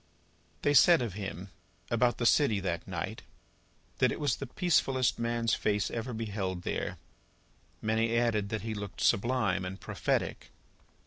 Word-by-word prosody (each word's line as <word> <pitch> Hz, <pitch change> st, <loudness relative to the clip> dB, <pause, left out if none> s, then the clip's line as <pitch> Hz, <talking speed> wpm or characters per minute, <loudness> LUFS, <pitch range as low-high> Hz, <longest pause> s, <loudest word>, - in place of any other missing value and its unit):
They 145 Hz, -, +3 dB
said 165 Hz, 0 st, +7 dB
of 115 Hz, -6 st, -4 dB
him, 95 Hz, -2 st, -6 dB, 0.4 s
about 120 Hz, 0 st, +2 dB
the 120 Hz, -, -1 dB
city 115 Hz, -5 st, +4 dB
that 85 Hz, -3 st, -3 dB
night, 95 Hz, +4 st, -4 dB, 0.8 s
that -, -, +4 dB
it -, -, -4 dB
was 140 Hz, -7 st, +1 dB
the 140 Hz, -, -6 dB
peacefullest 135 Hz, -6 st, +1 dB
man's 115 Hz, 0 st, 0 dB
face 105 Hz, -1 st, 0 dB
ever 115 Hz, +2 st, -4 dB
beheld 100 Hz, -5 st, -3 dB
there. -, -, -3 dB, 0.9 s
Many 115 Hz, +1 st, +1 dB
added 110 Hz, -4 st, +1 dB
that 110 Hz, -1 st, -3 dB
he 110 Hz, -1 st, -3 dB
looked 100 Hz, -4 st, -6 dB
sublime 110 Hz, -4 st, +2 dB
and 95 Hz, +1 st, -6 dB
prophetic. -, -, -2 dB
110 Hz, 145 wpm, -30 LUFS, 100-120 Hz, 0.9 s, said